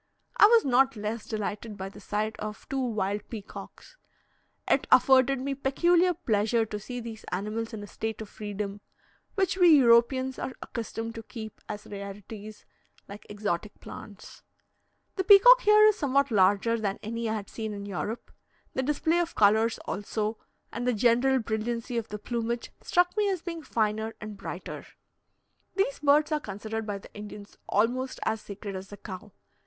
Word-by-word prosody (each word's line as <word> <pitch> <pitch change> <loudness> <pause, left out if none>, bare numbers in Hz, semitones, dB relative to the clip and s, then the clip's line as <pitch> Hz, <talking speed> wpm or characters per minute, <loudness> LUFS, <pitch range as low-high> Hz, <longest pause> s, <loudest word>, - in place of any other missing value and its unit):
I 415 - +9
was 460 0 +5
not 265 0 +4
less 215 +1 -4
delighted 215 0 -4
by 190 0 -5
the 200 - -13
sight 210 +2 -2
of 215 0 -6
two 270 - -1
wild 210 -4 -2
peacocks. 215 - -10 0.7
It - - +2
afforded 265 0 +5
me 275 +2 -2
peculiar 345 +7 +2
pleasure 225 - +1
to 210 -1 -5
see 245 +4 -6
these 225 -2 -8
animals 215 +5 -3
in 215 -2 -6
a - - -8
state 220 +1 -4
of 220 - -6
freedom, 205 -1 -5 0.5
which 385 -2 +1
we 360 -2 +6
Europeans 260 +1 +4
are 260 - -4
accustomed 230 -1 -5
to 230 - -7
keep 220 -1 -9
as 210 0 -6
rarities, 205 +1 -9 0.4
like 200 +1 -11
exotic 205 -1 -3
plants. 205 -2 -11 0.8
The 380 - +1
peacock 415 +6 +9
is - - -14
here 425 0 +7
somewhat 280 - +1
larger 205 +3 +3
than 200 -2 -1
any 230 +1 -3
I 220 - 0
had 205 -2 -5
seen 220 -1 -5
in 200 -1 -6
Europe; 205 +4 -5 0.4
the - - 0
display 300 +5 +1
of 345 -1 -2
colours 220 +2 +4
also, 215 +1 -3 0.3
and 240 +2 -3
the 250 - +3
general 245 +4 +3
brilliancy 230 +1 -2
of 225 - -7
the 210 - -5
plumage, 235 +2 -3
struck 355 0 +2
me 420 -1 +2
as 370 -4 -2
being 335 -2 -5
finer 220 -4 -1
and 215 -1 -7
brighter. - - -7 0.9
These 430 +6 0
birds 295 +2 +4
are 305 - +2
considered 220 -1 -5
by 205 -1 -2
the 195 - -14
Indians 205 -1 -10
almost 250 +5 0
as 220 0 0
sacred 200 0 -7
as 190 +1 -6
the 205 - -10
cow. 200 +1 -9
225 Hz, 170 wpm, -28 LUFS, 210-265 Hz, 0.9 s, I